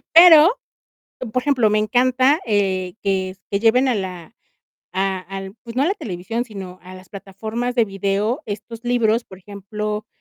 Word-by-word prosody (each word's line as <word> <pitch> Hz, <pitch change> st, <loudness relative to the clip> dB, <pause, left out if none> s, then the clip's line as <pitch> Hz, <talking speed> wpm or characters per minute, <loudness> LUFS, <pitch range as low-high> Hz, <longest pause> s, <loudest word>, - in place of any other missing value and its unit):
Pero, 335 Hz, +3 st, +8 dB, 0.7 s
por 255 Hz, -, 0 dB
ejemplo, 255 Hz, -6 st, +2 dB
me 215 Hz, -, +2 dB
encanta, 255 Hz, +6 st, +2 dB
eh, 190 Hz, -4 st, 0 dB
que 190 Hz, -2 st, 0 dB
s 190 Hz, +1 st, -15 dB
que 200 Hz, -, +1 dB
lleven 250 Hz, +4 st, +4 dB
a 250 Hz, -, +2 dB
la 185 Hz, 0 st, -6 dB, 0.6 s
a 190 Hz, 0 st, 0 dB
al, 195 Hz, +1 st, -8 dB
pues 230 Hz, -1 st, -9 dB
no 260 Hz, -, +1 dB
a -, -, +2 dB
la 385 Hz, -, +1 dB
televisión, 220 Hz, -, -4 dB
sino 190 Hz, -6 st, -9 dB
a 185 Hz, +1 st, -11 dB
las 185 Hz, -1 st, -14 dB
plataformas 220 Hz, +6 st, -5 dB
de 235 Hz, -3 st, +3 dB
video 200 Hz, -, -1 dB
estos 220 Hz, +3 st, -7 dB
libros, 235 Hz, -1 st, +1 dB
por 190 Hz, -, -13 dB
ejemplo, 210 Hz, +2 st, -5 dB
210 Hz, 170 wpm, -21 LUFS, 195-245 Hz, 0.7 s, Pero